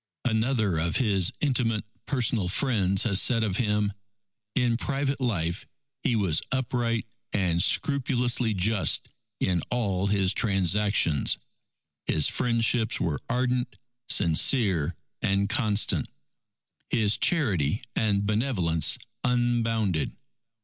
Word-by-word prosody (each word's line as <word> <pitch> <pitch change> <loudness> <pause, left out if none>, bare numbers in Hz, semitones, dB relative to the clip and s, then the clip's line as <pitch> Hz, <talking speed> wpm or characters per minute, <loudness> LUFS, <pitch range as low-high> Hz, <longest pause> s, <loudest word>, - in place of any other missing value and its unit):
Another 110 -6 +1
of 85 0 -1
his 100 -8 +2
intimate 120 -7 0 0.2
personal 120 -7 0
friends 100 -3 +1
has 100 -4 +2
said 115 -3 +3
of 100 -4 -1
him, 105 -3 0 0.6
"In 125 -3 +2
private 140 +2 -2
life 85 -8 -2 0.3
he 120 - +1
was 95 -8 +2
upright 120 -3 -1 0.3
and 90 -4 +1
scrupulously 125 -2 +1
just 100 +2 +1 0.3
in 90 -3 0
all 100 -6 -1
his 100 -2 +2
transactions. 95 -5 +2 0.7
His 75 - +3
friendships 115 -1 0
were 80 -3 -1
ardent, 125 0 -1 0.3
sincere, 90 - +2 0.3
and 100 +1 +1
constant, 110 -4 0 0.8
his 105 -2 +2
charity 105 - +1
and 100 -2 +1
benevolence 105 - +1 0.3
unbounded. 115 - 0
110 Hz, 100 wpm, -26 LUFS, 95-120 Hz, 0.8 s, said